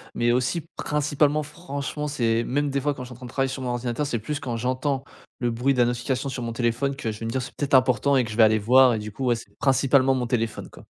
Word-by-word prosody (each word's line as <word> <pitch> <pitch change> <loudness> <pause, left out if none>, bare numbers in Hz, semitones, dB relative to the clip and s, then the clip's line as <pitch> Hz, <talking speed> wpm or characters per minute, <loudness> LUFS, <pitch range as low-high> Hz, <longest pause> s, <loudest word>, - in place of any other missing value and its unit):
mais 120 0 +2
aussi 130 +7 0
principalement 150 0 +1
franchement 150 -2 -5
c'est 115 -4 +1
même 145 +2 0
des 140 0 -1
fois 145 0 0
quand 125 - -7
je 125 - -10
suis - - -9
en - - -12
train 125 - -9
de - - -11
travailler 135 -1 0
sur 130 0 -5
mon 125 - -3
ordinateur, 120 +3 -2
c'est 120 - -1
plus 145 +7 -4
quand 120 -4 -4
j'entends 130 +3 -1 0.4
le 120 -1 0
bruit 130 +4 +1
de - - -1
la 120 - +5
notification 125 +3 -2
sur 130 - -5
mon 115 -1 -3
téléphone 125 +4 0
que 115 -6 -3
je 105 - -9
vais 115 - -5
me - - -2
dire: 130 - -1
«C'est - - -9
peut - - -4
être 135 - +2
important» 130 +2 +3
et 125 - +3
que 110 - -7
je - - -5
vais 115 - +7
aller 110 0 +5
voir 125 +2 +5
et - - -2
du 105 0 -6
coup 130 +6 -4
ouais, 120 -1 +3
c'est 115 - -11
principalement 135 -1 +3
mon 125 -1 -1
téléphone 115 -2 -2
quoi. - - -14
130 Hz, 295 wpm, -24 LUFS, 120-140 Hz, 0.4 s, vais